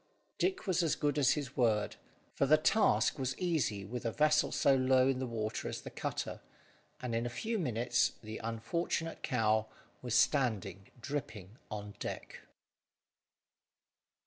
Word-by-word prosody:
Dick 375 -6 0
was 185 -3 +2
as 165 -3 +1
good 145 0 0
as 135 -2 +5
his 140 -4 -4
word, 110 -4 +1 0.4
for 140 - +1
the 155 +3 +7
task 195 -1 +3
was 130 0 -2
easy 135 - 0
with 120 +4 -5
a 115 - -1
vessel 150 +3 +3
so 140 - +4
low 130 0 +4
in 135 -1 +1
the 130 - -2
water 110 -2 -3
as - - -5
the - - -8
cutter; - - -4 0.6
and 125 -2 -2
in 115 +1 0
a - - -3
few 220 - -2
minutes 120 - +1
the 110 0 -6
unfortunate 160 +9 -2
cow 110 -3 +1 0.3
was 125 -2 -2
standing 110 - +1
dripping 115 -8 -5
on 105 -1 -6
deck. - - -6
125 Hz, 150 wpm, -33 LUFS, 110-150 Hz, 0.6 s, the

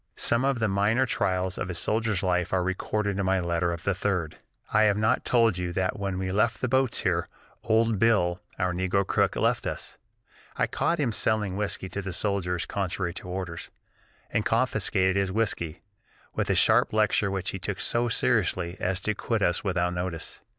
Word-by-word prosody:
Some 115 +2 +2
of 135 -1 +1
the 110 -1 +1
minor 105 +6 +2
trials 95 -5 -1
of 90 - -3
a 90 - -3
soldier's 110 0 0
life 90 -2 0
are 95 -1 +1
recorded 100 +2 -2
in 100 - 0
my 95 0 +2
letter 85 0 0
of 85 0 -5
the 100 - +1
3d: 90 -4 -1 0.4
"I 110 0 +5
have 105 -1 +3
not 110 +4 +1
told 115 -6 +3
you 90 -1 -2
that 95 +2 -1
when 100 -2 -2
we 95 0 -2
left 110 +4 +1
the 130 - -1
boats 130 0 +2
here, - - 0 0.3
old 110 -2 +2
Bill, 95 -6 +2 0.2
our 90 -1 0
negro 95 +2 0
cook, - - +1
left - - +1
us. - - -6 0.6
I - - +3
caught 170 - -1
him 135 -6 +1
selling 105 -3 +1
whiskey 100 -2 -2
to 100 +3 -4
the 95 -1 -5
soldiers 90 -4 -1
contrary 95 -2 -2
to 90 - -8
orders, 90 -2 -5 0.6
and 105 - +1
confiscated 105 -5 +1
his 95 -1 0
whiskey, 95 -6 -1 0.5
with - - -2
a - - +3
sharp - - +4
lecture 110 -1 +2
which 95 -1 -2
he 95 - -5
took 95 +2 -4
so 120 0 +1
seriously 95 -7 0
as 90 0 0
to 105 - 0
quit 110 0 -1
us 85 +1 +1
without 90 -3 0
notice. 90 -2 -5
95 Hz, 190 wpm, -27 LUFS, 90-110 Hz, 0.6 s, I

